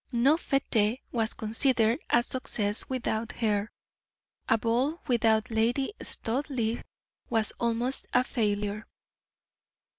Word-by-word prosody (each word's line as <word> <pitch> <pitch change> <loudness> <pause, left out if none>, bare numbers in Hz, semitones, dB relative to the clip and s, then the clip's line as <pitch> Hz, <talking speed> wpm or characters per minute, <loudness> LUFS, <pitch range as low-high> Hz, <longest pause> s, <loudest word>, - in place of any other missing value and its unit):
No 255 +5 +4
fete 255 -7 +1
was 225 -2 -1
considered 225 +2 +2
a 240 - +4
success 215 -5 0
without 230 -3 -2
her 210 -2 0 0.8
a 225 - +5
ball 245 +9 0
without 225 -1 +2
Lady 240 - +1
Studleigh 235 -2 -2 0.5
was 225 -2 +2
almost 235 +3 0
a 250 - +4
failure. 210 -3 -1
230 Hz, 100 wpm, -28 LUFS, 220-255 Hz, 0.8 s, a